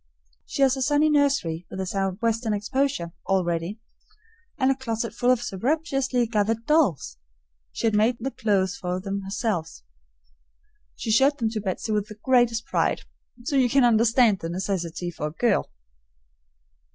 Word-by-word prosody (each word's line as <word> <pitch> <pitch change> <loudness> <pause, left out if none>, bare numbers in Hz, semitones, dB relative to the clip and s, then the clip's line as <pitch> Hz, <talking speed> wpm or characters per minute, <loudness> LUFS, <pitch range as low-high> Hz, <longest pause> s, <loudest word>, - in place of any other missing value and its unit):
She 275 - 0
has 265 -1 +4
a 265 - -4
sunny 295 +3 +3
nursery, 275 - +1
with 190 - -7
a 190 - -2
southwestern 215 +4 -1
exposure, 235 -3 -1 0.2
all 190 -1 +2
ready. 170 +5 -3 0.8
And 260 0 +3
a - - +1
closet 230 -3 -3
full 245 - 0
of 250 -2 +3
surreptitiously 270 - 0
gathered 225 0 -1
dolls! 270 - +1 0.5
She - - -4
has 225 - +2
made 220 +3 +3
the 265 +4 -3
clothes 200 -4 0
for 180 0 -3
them 195 +1 -4
herself, 195 - -3 1.1
she 225 - -3
showed 270 +6 +4
them 225 -4 -1
to 220 -2 -3
Betsy 195 +2 -3
with 210 -1 0
the 215 - -10
greatest 235 0 +2
pride, - - 0 0.4
so 280 - -2
you 255 -2 +4
can 275 +1 +4
understand 230 -2 +4
the 165 - -5
necessity 175 -1 -3
for 150 -2 -4
a - - -6
girl. 235 +7 +1
225 Hz, 160 wpm, -25 LUFS, 190-255 Hz, 1.1 s, has